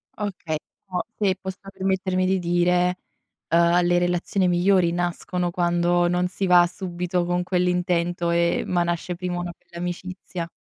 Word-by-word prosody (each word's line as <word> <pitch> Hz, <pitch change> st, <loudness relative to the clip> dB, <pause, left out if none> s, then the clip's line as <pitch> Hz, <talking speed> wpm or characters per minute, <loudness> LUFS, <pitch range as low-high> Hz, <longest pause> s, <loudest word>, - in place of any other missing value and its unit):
Okay, 180 Hz, -7 st, -3 dB, 0.3 s
però 185 Hz, -2 st, -2 dB, 0.2 s
se 195 Hz, -3 st, +2 dB
posso 190 Hz, 0 st, -6 dB
permettermi 190 Hz, -1 st, 0 dB
di 190 Hz, 0 st, +2 dB
dire, 180 Hz, +1 st, +2 dB, 0.5 s
ehm, 170 Hz, +1 st, +4 dB
le 175 Hz, 0 st, +3 dB
relazioni 175 Hz, +2 st, +1 dB
migliori 180 Hz, 0 st, +3 dB
nascono 175 Hz, 0 st, -2 dB
quando 175 Hz, 0 st, +2 dB
non 180 Hz, +1 st, +1 dB
si 190 Hz, +1 st, -2 dB
va 175 Hz, -1 st, +7 dB
subito 180 Hz, -1 st, -2 dB
con 175 Hz, 0 st, 0 dB
quell'intento 180 Hz, -1 st, 0 dB
e 170 Hz, 0 st, +2 dB
ma 175 Hz, -1 st, +1 dB
nasce 175 Hz, +1 st, -2 dB
prima 175 Hz, 0 st, -3 dB
una 175 Hz, 0 st, -4 dB
bella 170 Hz, -, -15 dB
amicizia. 180 Hz, 0 st, -5 dB
175 Hz, 145 wpm, -24 LUFS, 175-185 Hz, 0.5 s, va